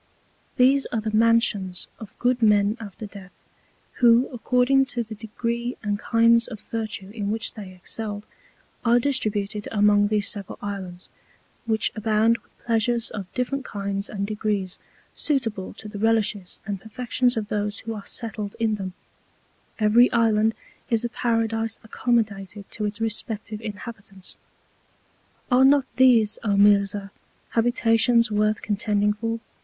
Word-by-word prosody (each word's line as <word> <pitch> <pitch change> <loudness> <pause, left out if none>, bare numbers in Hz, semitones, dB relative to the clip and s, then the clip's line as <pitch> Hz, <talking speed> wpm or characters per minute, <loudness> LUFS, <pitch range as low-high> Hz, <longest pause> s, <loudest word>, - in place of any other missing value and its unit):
These 270 +2 +4
are 230 - -2
the 215 0 -2
Mansions 215 -5 +2
of 215 -2 -11
good 245 0 +1
Men 210 -1 +4
after 215 0 -8
Death, 195 -2 -12 0.6
who 240 +1 +5
according 250 +3 +2
to 240 -3 -2
the 220 0 -9
Degree 235 +3 -3
and 205 -1 -1
Kinds 230 +1 +4
of 220 -4 -8
Virtue 215 -4 -5
in 205 -2 -3
which 220 +1 -1
they 200 -4 -9
excelled, 205 +3 -6 0.6
are 235 0 +4
distributed 210 -6 -1
among 205 -1 +4
these 210 -1 +1
several 200 -4 -4
Islands, 190 -3 -6 0.6
which 220 -1 +1
abound 220 +1 +2
with - - -33
Pleasures 235 0 +1
of 195 -3 -7
different 260 +2 -1
Kinds 200 -2 -4
and 200 -1 -3
Degrees, 205 -3 -2 0.3
suitable 225 -10 -1
to 215 - -9
the 210 -1 -7
Relishes 215 -4 0
and 200 -3 -4
Perfections 245 +2 -1
of 215 -1 -3
those 210 0 -1
who 225 -1 -5
are 210 -2 -7
settled 215 -3 -3
in 220 -2 +1
them; 185 -1 -5 0.8
every 225 +3 +5
Island 225 -2 +3 0.3
is 230 -1 +1
a - - -1
Paradise 225 -1 -1
accommodated 210 -4 -1
to 210 - -3
its 205 +1 -3
respective 220 -1 -2
Inhabitants. 200 -3 -8 1.1
Are 250 +1 +6
not 275 0 +5
these, 235 -5 +5
O 205 -3 +1
Mirzah, 200 -1 +3 0.4
Habitations 230 0 +3
worth 215 +1 +1
contending 210 0 +1
for? 225 +2 -3
220 Hz, 140 wpm, -24 LUFS, 205-230 Hz, 1.1 s, Are